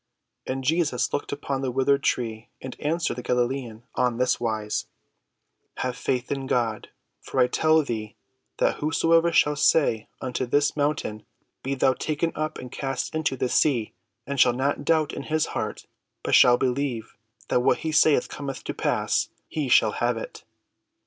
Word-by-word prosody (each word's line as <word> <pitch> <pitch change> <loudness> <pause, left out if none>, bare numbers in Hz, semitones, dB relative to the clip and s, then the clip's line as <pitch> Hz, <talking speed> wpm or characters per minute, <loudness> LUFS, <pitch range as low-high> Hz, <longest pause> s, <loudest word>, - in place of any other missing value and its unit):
And 135 +1 -3
Jesus 150 -3 +1
looked - - -2
upon 140 -1 -3
the 135 - -1
withered 135 +2 +2
tree 115 -4 -2
and 130 - -7
answered 160 -2 -1
the - - -4
Galilean 125 -2 -1
on 125 -2 +1
this 125 0 +1
wise: 110 -2 -2 0.9
"Have 125 -1 -2
faith 125 -1 -2
in 135 -1 -2
God; 115 -4 -1 0.3
for - - -4
I - - +6
tell 155 +4 +3
thee 110 -5 -5 0.4
that - - +1
whosoever 165 +2 +3
shall 150 -2 +3
say 140 -7 +2
unto 130 0 -3
this 145 +3 +2
mountain, 145 -7 -1 0.4
Be 135 +1 -2
thou 130 0 +3
taken 155 +5 -2
up 155 0 -3
and 125 -1 -9
cast 135 -2 -3
into 155 -4 -1
the 125 - 0
sea, 125 -4 +1 0.3
and 140 -1 -4
shall 125 - +6
not 140 +3 -1
doubt 155 -2 +2
in - - -4
his 155 0 +2
heart, - - -4 0.4
but - - -2
shall 125 -1 +7
believe 130 -3 -2 0.4
that - - +3
what - - +3
he 160 - 0
saith 155 -4 +4
cometh 140 -2 -6
to - - -4
pass; - - 0 0.2
he 150 -4 -2
shall 110 -3 +5
have 120 +2 0
it. 115 - -8
130 Hz, 170 wpm, -25 LUFS, 120-150 Hz, 0.9 s, shall